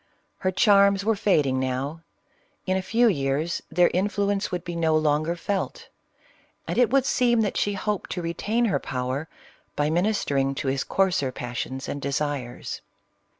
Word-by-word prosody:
Her 185 - +1
charms 200 0 +4
were 225 0 +3
fad 190 -7 +2
ing 130 -1 0
now; 130 +5 -2 0.6
in 185 - +1
a 190 - 0
few 235 +5 +3
years 150 -2 0
their 175 0 +3
influence 200 +1 0
would 180 -1 -3
be 175 -1 -5
no 160 -2 +2
longer 155 +2 +1
felt; 205 - -3 0.8
and - - -1
it 245 -4 +5
would 270 +1 +3
seem, 240 -4 +3
that 205 -3 -1
she 205 - +1
hoped 205 0 -3
to 180 - -3
re 170 0 -2
tain 225 +7 0
her 200 - +1
power, 130 +4 -3 0.5
by 150 +1 +1
ministering 160 -7 +1
to 135 - -2
his 135 0 0
coarser 185 -8 +1
passions 125 +2 -5
and 145 - -4
desires. 140 -3 -3
175 Hz, 165 wpm, -25 LUFS, 140-200 Hz, 0.8 s, it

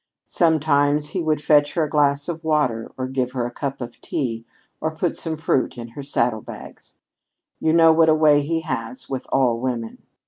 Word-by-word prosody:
Sometimes 150 -3 +2
he 180 - -2
would 155 -2 0
fetch 145 -1 +3
her 165 - +2
a 150 - -2
glass 145 -1 +2
of 165 -2 -5
water, 150 -8 0
or 130 - -2
give 130 -1 -2
her 125 -2 -1
a 120 - -4
cup 140 0 -5
of 120 -1 -8
tea, 115 -4 -3 0.3
or 160 0 -3
put 170 +2 -1
some 160 -2 -4
fruit 150 -5 0
in 120 -1 -7
her 130 +5 -8
saddle 120 -5 0
bags. - - -11 0.6
You 160 - +1
know 165 -1 +6
what 160 0 +4
a 155 - +5
way 150 -2 +5
he 165 +3 -1
has 130 -5 -5
with 130 -1 -4
all 125 -4 +2
women! 120 -3 -4
145 Hz, 200 wpm, -22 LUFS, 125-155 Hz, 0.6 s, know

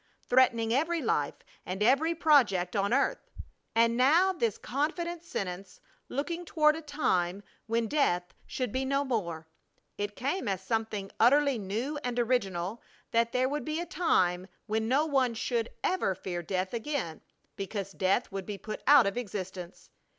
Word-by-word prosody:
threatening 235 -3 +3
every 325 +6 +1
life 150 - 0 0.3
and 190 +3 -3
every 290 +8 +3
project 240 - +3
of 200 +1 +1
earth! 275 +3 +1 0.5
And 230 0 +4
now 320 +10 +4
this 235 - -1
confident 335 +5 -2
sentence 195 - -5 0.3
looking 335 +6 -3
toward 305 -2 +3
a 325 - -6
time 200 - 0 0.2
when 230 +1 +1
death 180 - +1
should 255 -4 -3
be 260 +3 -1
no 275 +1 +1
more! 170 - -3 0.5
It 205 0 -3
came 285 - -2
as 195 -2 -1
something 215 -2 -2
utterly 275 +1 +4
new 225 +10 -3
and 245 -1 -2
original 215 -5 0 0.3
that 230 0 +2
there 255 0 +2
would 295 +2 -2
be 310 +1 -2
a 345 - -3
time 185 - +1 0.2
when 220 0 -1
no 275 +6 +3
one 265 -6 +1
should, 230 0 -1
ever 360 - +1
fear 175 -1 -4
death 185 +3 -2
again 235 - -3 0.3
because 195 0 -4
death 195 +5 0
would 195 -1 -5
be 205 -1 -4
put 215 +2 -7
out 285 -4 +8
of 200 +3 -1
existence! 190 -6 -6
235 Hz, 160 wpm, -29 LUFS, 195-285 Hz, 0.5 s, out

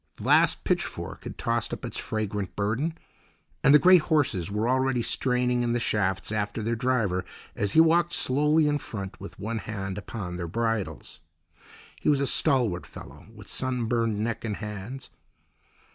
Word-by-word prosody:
The - - -10
last - - +4
pitchfork - - -2
had - - -7
tossed - - -1
up - - -5
its - - -5
fragrant 105 -3 -3
burden, 120 +11 -1 0.7
and - - +6
the 150 - +9
great 180 +2 +7
horses 145 - +1
were 105 +3 -1
already 130 -1 +1
straining 125 0 +1
in 120 -1 0
the 120 - +1
shafts 95 -4 0
after 105 0 -2
the 115 +2 0
driver, 115 -7 0 0.3
as 100 0 -1
he 160 - +7
walked 170 +1 +3
slowly 150 +4 +3
in 145 0 +1
front 100 -7 -7
with 100 - -9
one 110 +2 -3
hand 95 -1 -5
upon 90 -3 -6
their 85 -1 -4
bridles. 110 -5 -3 0.8
He - - +1
was 145 -2 +3
a 140 - +1
stalwart 120 -10 +1
fellow, - - -12
with - - -13
sunburned 120 -4 -1
neck 115 +2 -2
and 110 -3 -2
hands. 105 +5 -7
115 Hz, 165 wpm, -27 LUFS, 100-130 Hz, 0.8 s, the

